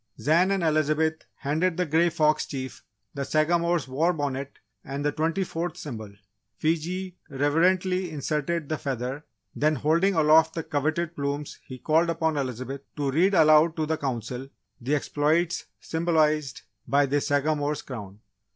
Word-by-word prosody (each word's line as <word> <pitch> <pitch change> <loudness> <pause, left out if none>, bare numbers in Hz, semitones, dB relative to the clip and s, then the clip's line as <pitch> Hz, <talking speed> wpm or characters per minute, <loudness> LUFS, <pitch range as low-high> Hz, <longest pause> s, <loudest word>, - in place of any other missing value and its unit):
Zan 170 +5 +3
and 195 -3 0
Elizabeth 155 0 +1
handed 160 +5 0
the 180 - +1
Grey 165 +3 +3
Fox 155 -2 +2
Chief 130 -1 -6 0.3
the 140 - -3
Sagamore's 170 +1 +1
war 160 +7 +1
bonnet 140 -2 -4 0.3
and 140 +2 -4
the 145 - +2
twenty 160 +5 0
fourth 170 -1 -4
symbol. 110 -8 -7 0.5
Fiji 175 +4 -2
reverently 180 +6 +1
inserted 155 +1 -2
the 155 0 -2
feather, 135 +2 -4 0.3
then, 155 +1 +2
holding 165 +8 +2
aloft 160 +1 +5
the 165 - -2
coveted 155 +4 -1
plumes 140 +1 -3
he 130 - -8
called 160 +5 +2
upon 160 -1 0
Elizabeth 130 0 -4
to 145 -2 -1
read 185 +7 +3
aloud 155 0 +6
to 155 - 0
the 160 +1 0
Council, 125 -1 -4 0.3
the 135 +5 0
exploits 155 +4 0
symbolised 155 -4 0 0.2
by 140 +1 +3
this 140 +1 0
Sagamore's 145 0 0
Crown. 105 -5 -8
155 Hz, 145 wpm, -26 LUFS, 140-165 Hz, 0.5 s, aloud